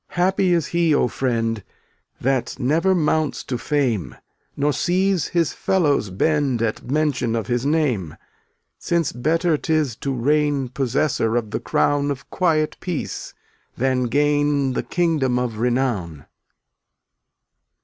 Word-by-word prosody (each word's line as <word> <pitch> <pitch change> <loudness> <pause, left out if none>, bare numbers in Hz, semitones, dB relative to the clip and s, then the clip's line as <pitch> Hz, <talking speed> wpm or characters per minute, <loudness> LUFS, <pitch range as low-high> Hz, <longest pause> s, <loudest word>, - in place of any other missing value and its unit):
298 175 0 +2 0.2
Happy 180 - +3
is 165 - 0
he, 170 -3 +2
O 125 - +3
friend, 115 -4 -1 0.6
That 130 -1 0
never 165 +9 +2
mounts 155 -2 0
to 130 - -4
fame, 130 - -1 0.4
Nor 145 +1 +1
sees 185 0 +1
his 170 -3 0
fellows 150 - +1
bend 135 +5 +1
At 110 -2 -1
mention 140 -5 0
of 115 - -2
his 120 +2 -1
name, 130 - 0 0.6
Since 170 -4 0
better 160 +6 +1
'tis 155 -7 0
to 140 - -3
reign 140 +1 +1
Possessor 130 -2 0
of 115 -3 -1
the - - -2
crown 145 0 +1
Of 140 -1 -5
quiet 160 -4 +1
peace 180 -5 -5 0.4
than 130 0 +1
gain 145 +1 +1
The - - -1
kingdom 155 -8 0
of 120 -3 -2
renown. 115 - -1
140 Hz, 130 wpm, -22 LUFS, 120-155 Hz, 0.6 s, Happy